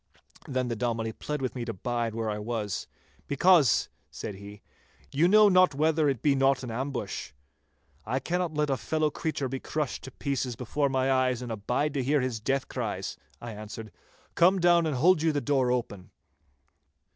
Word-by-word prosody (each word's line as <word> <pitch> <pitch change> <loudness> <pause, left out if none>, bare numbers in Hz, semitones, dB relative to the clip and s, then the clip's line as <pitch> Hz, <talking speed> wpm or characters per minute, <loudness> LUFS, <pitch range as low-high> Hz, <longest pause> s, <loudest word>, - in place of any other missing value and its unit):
Then 130 -2 -1
the 120 - -2
Dominie 115 -1 -1
pled 150 +3 -4
with 130 - -2
me 125 - -4
to 115 -1 -4
bide 115 +2 -2
where 110 -1 -1
I 105 - -3
was 105 -3 -3 0.4
'because,' 150 - +4 0.2
said - - -6
he, 100 +1 -11 0.5
'you 150 +5 +3
know 210 +2 +7
not 185 -5 +5
whether 155 0 +2
it 135 -5 -2
be 145 - +4
not 135 -1 +2
an 125 - -5
ambush.' 120 - -4 0.7
'I 125 +4 0
cannot 175 +1 -2
let 150 -1 +1
a 135 - +1
fellow 155 +1 0
creature 150 -4 -2
be 135 +1 -4
crushed 150 -1 -3
to - - -7
pieces 135 -2 -2
before 140 +4 -1
my 130 0 +1
eyes 130 -2 +1
and 120 - -5
abide 125 +7 -1
to 135 -3 -1
hear 145 +3 +2
his 125 -4 -2
death 135 +4 -1
cries,' - - -4 0.2
I 120 - -7
answered. 110 0 -8 0.4
'Come 180 +3 +4
down 175 -1 +4
and 150 - -1
hold 165 +5 +4
you 160 0 +3
the 145 - 0
door 135 -3 +1
open. 100 -7 -3
130 Hz, 185 wpm, -28 LUFS, 115-150 Hz, 0.7 s, know